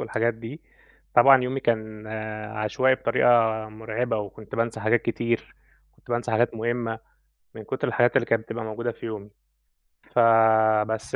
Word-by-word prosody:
والحاجات 115 +1 -1
دي، 115 +8 -9 0.5
طبعًا 130 +1 +7
يومي 130 +2 -2
كان 110 -2 -2 0.5
عشوائي 130 +5 +2
بطريقة 115 -1 +1 0.4
مُرعبة 110 +2 -3
وكنت 105 +1 -8
بانسى 115 -1 -2
حاجات 110 +3 +2
كتير، 115 0 -2 0.4
كنت - - -18
بانسى 120 0 -2
حاجات 115 +2 +2
مهمّة، 115 0 -2 0.6
من - - -9
كُتر - - -3
الحاجات 120 +2 +2
اللي 130 - +3
كانت 115 -1 0
بتبقى 115 +1 -6
موجودة 115 +2 -4
في - - -11
يومي 105 -2 -7 0.8
ف 125 - +1 0.7
بس 110 +1 -4
115 Hz, 145 wpm, -25 LUFS, 110-120 Hz, 0.8 s, طبعًا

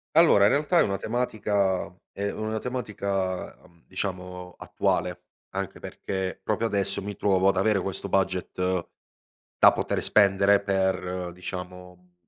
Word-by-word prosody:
Allora, 160 -12 +6
in - - +4
realtà 155 +4 +3
è - - +6
una 100 -1 0
tematica 105 -4 0 0.3
è 100 0 -3
una 110 0 -3
tematica, 100 -6 -3
uhm, 85 -1 -23
diciamo 90 -1 -5
attuale - - -1 0.3
anche 95 0 -4
perché 95 -1 -4
proprio 110 +3 0
adesso 100 -2 0
mi 105 +1 -5
trovo 95 -2 +2
ad 95 - +2
avere 100 +1 +3
questo 95 +1 -4
budget 95 -1 0 0.7
da - - +8
poter - - -1
spendere 100 -1 +4
per 95 -2 -1
diciamo 90 0 -8
95 Hz, 130 wpm, -26 LUFS, 90-100 Hz, 0.7 s, da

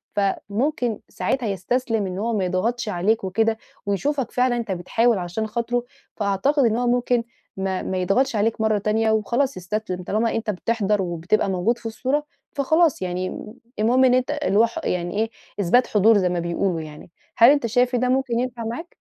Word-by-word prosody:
فممكن 220 +5 -1
ساعتها 260 -4 -1
يستسلم 220 +3 -1
إن 185 0 -5
هو 230 +3 -1
ما 190 - 0
يضغَطش 220 +6 -1
عليك 205 +3 +1
وكده، 220 +4 +1 0.3
ويشوفك 270 +6 -1
فعلًا 250 -1 +2
أنت 225 -4 -3
بتحاول 220 +5 +1
عشان 180 +5 -3
خاطره، 235 +2 -1 0.3
فأعتقد 220 +8 +1
إن 225 -1 +2
هو 245 +1 0
ممكن 245 -1 +1 0.3
ما 190 -1 -2
ما 190 - -3
يضغَطش 220 +8 +1
عليك 220 +1 0
مرّة 220 -1 +2
تانية 220 +2 +1
وخلاص 235 +3 0
يستسلِم، 185 0 -4
طالما 220 +5 0
أنت 225 -1 -2
بتحضر 210 0 0
وبتبقى 175 +3 0
موجود 190 +6 +1
في 235 - -20
الصورة 265 +6 -1 0.3
فخلاص 315 - +2
يعني 185 +3 -4 0.3
المهم 245 +5 +4
إن 250 - +4
أنت 255 +3 +1
الهو 255 -8 +3
ح 230 - -5
يعني 175 +2 -2
إيه 225 +1 +1 0.3
إثبات 225 +7 +3
حضور 215 +1 +4
زي 185 -2 +2
ما 175 0 -1
بيقولوا 170 0 -1
يعني. 155 +2 -11 0.3
هل 235 +2 +8
أنت 285 -4 +2
شايف 245 +2 +2
إن - - +2
ده 250 0 +1
ممكن 255 -2 +1
ينفَع 245 -1 -3
معاك؟ 245 +10 -6
225 Hz, 180 wpm, -23 LUFS, 195-245 Hz, 0.3 s, هل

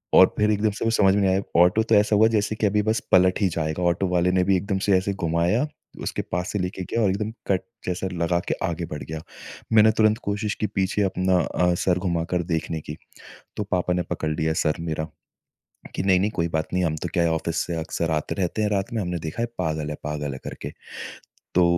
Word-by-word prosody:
और - - +9
फ़िर 105 0 +3
एकदम 105 +1 +1
से 100 - -4
कुछ 115 0 +2
समझ 95 -2 +5
में 105 - +2
नहीं 95 -1 +3
आया, 95 +1 +2 0.2
ऑटो 90 +5 +4
तो 110 0 +3
ऐसा 105 +1 +4
हुआ 110 +2 +6
जैसे 105 +1 0
कि 110 - 0
अभी 105 +1 +2
बस 110 - +2
पलट 95 +2 +5
ही 100 - +4
जाएगा। 80 +2 -1
ऑटो 90 +2 +1
वाले 90 0 +2
ने 90 0 +3
भी 100 0 +3
एकदम 100 +2 -1
से 100 -2 +5
ऐसे 100 +2 -1
घुमाया 85 - +2 0.4
उसके - - -2
पास 90 +2 -1
से 105 - 0
लेके 90 0 -3
गया 115 - -1
और 100 - +3
एकदम 105 +3 -2 0.2
कट 95 -2 +2 0.2
जैसा 90 +1 -2
लगा 85 0 +1
के - - +2
आगे 85 0 -3
बढ़ 75 - -5
गया। 80 0 -6 0.5
मैंने 110 0 +7
तुरंत 110 0 +4
कोशिश 105 0 -1
की 105 - +2
पीछे 95 +1 0
अपना 95 -1 +1
अ, 90 0 +1
सर 90 0 +1
घुमाकर 85 -1 -1
देखने 80 0 -2
की। 75 0 -8 0.6
तो 105 - 0
पापा 90 -2 0
ने 90 - +1
पकड़ 80 - -2
लिया 80 +1 0
सर 75 -1 +1
मेरा 80 -1 -3 0.9
कि - - 0
नहीं-नहीं 95 +1 +3
कोई 85 -4 0
बात 80 -1 -1
नहीं। 90 0 +2
हम 80 -2 0
तो 85 - -1
क्या 85 - +3
है 85 - +2
ऑफ़िस 80 0 -2
से 85 - -3
अक्सर 80 +1 -2
आते 75 -1 -1
रहते 95 +3 -1
हैं 105 - +2
रात 100 0 -1
में। 115 - 0
हमने 90 -1 -2
देखा 80 +8 -4
है - - +1
पागल 80 -4 -1
है - - -3
पागल 75 -1 -3
है 65 - -6
करके। - - -6 0.8
तो 90 - +5
90 Hz, 235 wpm, -24 LUFS, 85-100 Hz, 0.9 s, और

